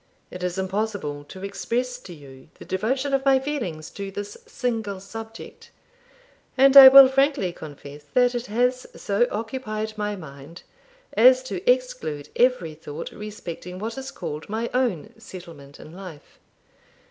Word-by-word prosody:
It 180 - -8
is 180 0 -3
impossible 190 -6 -3
to 190 +5 -11
express 245 +5 -3
to 195 - -12
you 140 -4 -14
the - - -13
devotion 260 +9 -1
of 270 0 +1
my 270 -1 +5
feelings 230 - -4
to 200 -1 -6
this 205 +1 -7
single 220 -6 -3
subject; 225 +3 -10 0.9
and 270 +1 +5
I 270 -1 +13
will 270 0 +10
frankly 270 -8 +1
confess 145 -1 -11
that 245 0 +4
it 240 0 -4
has 250 +4 0
so 205 +4 +1
occupied 220 -1 -4
my 210 0 -2
mind 155 -1 -12 0.5
as 255 +3 +6
to 260 +7 -5
exclude - - -3
every 245 -11 +2
thought 155 0 -8
respecting 185 -4 -8
what 220 +4 -5
is 265 0 -6
called 150 +5 -7
my 225 +3 -3
own 245 - -1
settlement 160 -6 -12
in 155 - -12
life. 180 -5 -12
210 Hz, 145 wpm, -24 LUFS, 170-250 Hz, 0.9 s, I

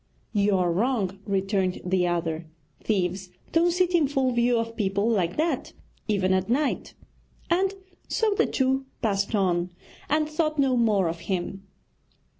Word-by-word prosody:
'You 205 -2 +3
are 180 -1 +1
wrong,' 200 -2 0
returned 195 -1 0
the 180 -1 +2
other, 165 -1 -2 0.4
'thieves 185 -2 -1 0.2
don't 335 +1 +4
sit 360 +1 +1
in 325 -5 +4
full 270 -2 +1
view 240 0 +2
of 230 0 -2
people 200 -1 0
like 190 -6 +1
that, 325 +2 -1 0.3
even 190 -3 +2
at 185 +1 0
night.' 275 +4 0 0.6
And 380 +3 +2 0.3
so 440 -2 +1
the 425 +2 +2
two 265 0 0 0.2
passed 200 0 0
on, 180 -3 +1 0.4
and 305 +1 +2
thought 310 0 -1
no 270 -2 +3
more 215 -6 +3
of 165 0 -3
him. 190 +1 -3
210 Hz, 150 wpm, -26 LUFS, 185-270 Hz, 0.6 s, don't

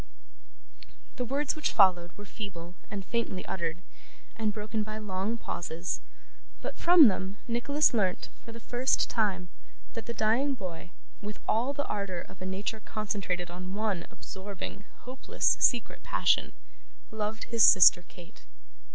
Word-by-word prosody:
The 250 - -1
words 280 +5 0
which 310 - 0
followed 180 -4 +4
were 205 - -9
feebly 180 -5 -7 0.2
and 200 -2 -5
faintly 225 -5 -2
uttered, 170 -1 -3 0.5
and 220 -2 0
broken 215 +1 -3
by 215 0 -4
long 210 +1 -2
pauses; 170 -4 -4 0.6
but, - - -5
from 340 -5 +8
them, 190 0 -1
Nicholas 250 +6 +2
learnt, 190 -6 0
for 230 - -9
the 230 - -9
first 245 +3 +1
time, 190 -6 0 0.4
that 230 - -6
the 235 - -3
dying 235 +7 +2
boy, 180 -6 -7 0.3
with 210 0 -6
all 240 +5 +2
the 285 0 -2
ardour 195 -4 -3
of - - -15
a 185 - -4
nature 200 +4 -3
concentrated 195 -5 -3
on 185 +2 -6
one 205 -5 -1
absorbing, 200 +1 -8 0.2
hopeless, 255 +2 0
secret 240 -4 +2
passion, - - +2 0.6
loved 220 0 -3
his 230 -2 +6
sister 185 -2 +8
Kate. 175 0 -15
210 Hz, 145 wpm, -29 LUFS, 185-230 Hz, 0.6 s, from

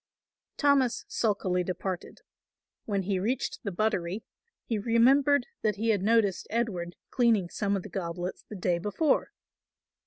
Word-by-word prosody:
Thomas 280 -4 +3
sulkily 190 -5 0
departed. 185 0 -4 0.6
When 200 -3 -1
he 190 0 0
reached 235 +7 -1
the 200 - -3
buttery 190 0 -1 0.4
he 225 -3 -1
remembered 250 +5 +4 0.2
that 210 -2 +1
he 225 +3 -1
had 205 -4 +3
noticed 210 -2 +2
Edward 190 -7 -2 0.2
cleaning 225 -8 +2
some 200 -1 0
of 185 - -5
the - - -9
goblets 175 0 -4
the 215 - -10
day 180 -2 0
before. 210 - +1
205 Hz, 135 wpm, -29 LUFS, 185-230 Hz, 0.6 s, remembered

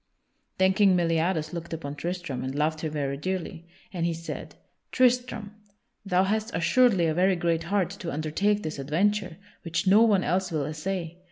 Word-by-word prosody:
Then 190 0 +4
King 195 -1 +4
Meliadus 165 -1 0
looked 170 -1 -6
upon 145 -3 -5
Tristram 165 -4 -4
and 130 +1 -4
loved 155 +1 0
him 155 - -3
very 140 -2 -2
dearly, 170 0 -4 0.3
and 175 -2 -2
he 170 -1 0
said: 165 +1 -7 0.4
"Tristram, 245 -4 +1 0.5
thou 185 -2 +2
hast 215 +3 0
assuredly 205 -1 +3
a 160 - +1
very 185 +3 +3
great 170 -1 0
heart 190 -1 0
to 180 -4 -6
undertake 195 +8 0
this 155 -2 -4
adventure, 185 +6 0 0.2
which 165 +4 -2
no 200 +3 +6
one 205 -5 +4
else 185 +1 0
will 150 -4 -1
essay. 165 +3 -4
175 Hz, 170 wpm, -27 LUFS, 160-195 Hz, 0.5 s, no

